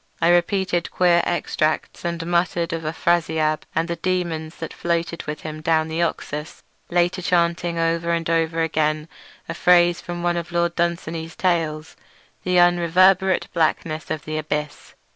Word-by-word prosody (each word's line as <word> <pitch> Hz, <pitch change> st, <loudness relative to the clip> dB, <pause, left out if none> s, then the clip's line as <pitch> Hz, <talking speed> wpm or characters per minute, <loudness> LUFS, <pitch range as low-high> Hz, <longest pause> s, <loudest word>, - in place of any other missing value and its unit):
I 170 Hz, -, +3 dB
repeated 175 Hz, 0 st, +1 dB
queer 175 Hz, -1 st, +3 dB
extracts, 155 Hz, -2 st, -1 dB
and 170 Hz, -1 st, -3 dB
muttered 170 Hz, -1 st, 0 dB
of 165 Hz, -, -3 dB
Afrasiab 160 Hz, -1 st, 0 dB
and 165 Hz, -, +1 dB
the 170 Hz, 0 st, -3 dB
daemons 170 Hz, -3 st, -2 dB
that 165 Hz, -, -7 dB
floated 170 Hz, 0 st, -2 dB
with 150 Hz, 0 st, -5 dB
him 155 Hz, 0 st, -7 dB
down 160 Hz, 0 st, +1 dB
the 160 Hz, +2 st, -2 dB
Oxus; 150 Hz, -2 st, -4 dB, 0.3 s
later 175 Hz, +1 st, +1 dB
chanting 170 Hz, -1 st, +1 dB
over 165 Hz, 0 st, 0 dB
and 170 Hz, -1 st, 0 dB
over 165 Hz, 0 st, +1 dB
again 155 Hz, -1 st, 0 dB, 0.4 s
a 165 Hz, -, -3 dB
phrase 175 Hz, 0 st, +4 dB
from 175 Hz, 0 st, -6 dB
one 175 Hz, 0 st, +1 dB
of 170 Hz, 0 st, -5 dB
Lord 170 Hz, 0 st, +1 dB
Dunsany's 170 Hz, -1 st, -2 dB
tales—"the 165 Hz, +1 st, -3 dB
unreverberate 180 Hz, +2 st, +4 dB
blackness 160 Hz, -1 st, -1 dB
of 155 Hz, -3 st, -4 dB
the 155 Hz, 0 st, -3 dB
abyss". 150 Hz, -1 st, -4 dB
170 Hz, 145 wpm, -22 LUFS, 160-175 Hz, 0.4 s, phrase